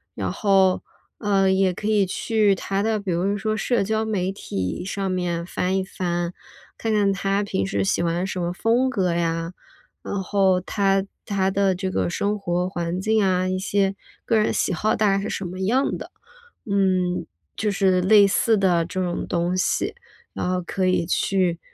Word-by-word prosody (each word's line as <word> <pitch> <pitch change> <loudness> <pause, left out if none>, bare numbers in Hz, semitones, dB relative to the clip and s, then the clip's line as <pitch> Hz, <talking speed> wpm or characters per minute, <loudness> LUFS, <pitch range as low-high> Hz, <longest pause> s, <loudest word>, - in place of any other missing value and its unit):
然 - - -2
后， 195 -3 +3 0.4
呃， 195 -2 +2
也 190 -1 +3
可 210 +4 -5
以 210 -3 +3
去 210 +1 +1
他 195 +2 -2
的 220 -1 +1
比 195 -3 -3
如 195 +4 0
说 215 +1 -1
社 240 +2 +1
交 220 +2 0
媒 195 -4 -1
体 95 - -4
上 195 0 -3
面 175 -2 -2
翻 185 +1 -1
一 190 - 0
翻， 175 -2 -2 0.4
看 225 - -2
看 205 -2 +3
他 195 +1 0
平 100 - -1
时 100 0 -1
喜 95 - +1
欢 170 +2 0
什 185 - -4
么 175 0 -1
风 235 +7 +1
格 185 -7 0
呀， 165 0 -1 0.5
然 200 -1 -3
后 190 -1 +2
他 195 +1 +1 0.2
他 195 -2 0
的 195 -1 +1
这 190 +1 -3
个 175 - 0
生 205 +3 -1
活 180 -2 -1
环 175 -1 -3
境 215 +2 +2
啊， 185 -1 +1
一 185 0 -1
些 195 0 0 0.3
个 225 - +2
人 215 - +2
喜 - - 0
好 215 +6 +1
大 215 - +3
概 195 - 0
是 210 - -4
什 195 - -3
么 185 +1 -6
样 250 +8 +1
的。 - - -9 0.6
嗯， 185 -2 +1 0.3
就 210 -1 0
是 190 -2 +2
类 200 +2 +6
似 220 +2 +2
的 180 -4 +3
这 185 +2 -3
种 175 -1 -2
东 175 +1 0
西， 185 - 0 0.4
然 180 - -2
后 185 0 0
可 185 +2 -2
以 180 -2 +2
去 180 -1 +1
190 Hz, 200 characters per minute, -23 LUFS, 180-200 Hz, 0.6 s, 类